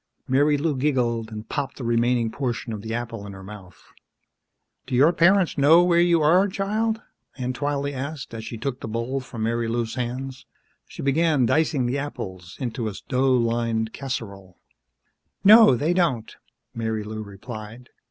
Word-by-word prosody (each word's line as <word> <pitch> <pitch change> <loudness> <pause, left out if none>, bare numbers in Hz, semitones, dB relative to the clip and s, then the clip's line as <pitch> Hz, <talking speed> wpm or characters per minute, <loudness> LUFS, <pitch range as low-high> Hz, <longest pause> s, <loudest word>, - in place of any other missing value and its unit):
Marilou 145 +3 +2
giggled 120 -5 0
and 105 0 -7
popped 140 -2 -3
the 130 - -6
remaining 120 0 +1
portion 120 -1 -3
of 105 - -5
the 110 +1 -6
apple 115 -3 -4
in 100 - -8
her 95 0 -10
mouth. 95 -3 -12 1.0
"Do 130 - -2
your 145 +7 +5
parents 180 -1 +3
know 160 +5 +7
where 175 -1 +3
you 170 -2 +3
are, 180 +6 +5
child?" 215 +3 -1 0.3
Aunt 125 -1 -3
Twylee 145 0 -1
asked, 140 0 -6
as 110 -1 -6
she 115 - -6
took 125 +3 -4
the - - -6
bowl 115 +4 -2
from 120 -3 -6
Marilou's 115 0 -1
hands. 130 +1 -5 0.4
She - - -8
began 145 -1 +2
dicing 150 0 +1
the 130 +4 -1
apples 95 -10 -7
into 120 -3 -3
a - - -7 0.2
dough 130 +1 +2
lined 115 -1 0
casserole. 100 -9 -6 0.9
"No, 215 - +8
they 155 +8 +1
don't," 145 -11 0 0.4
Marilou 110 -1 -3
replied. 110 +3 -9
125 Hz, 155 wpm, -24 LUFS, 115-145 Hz, 1.0 s, No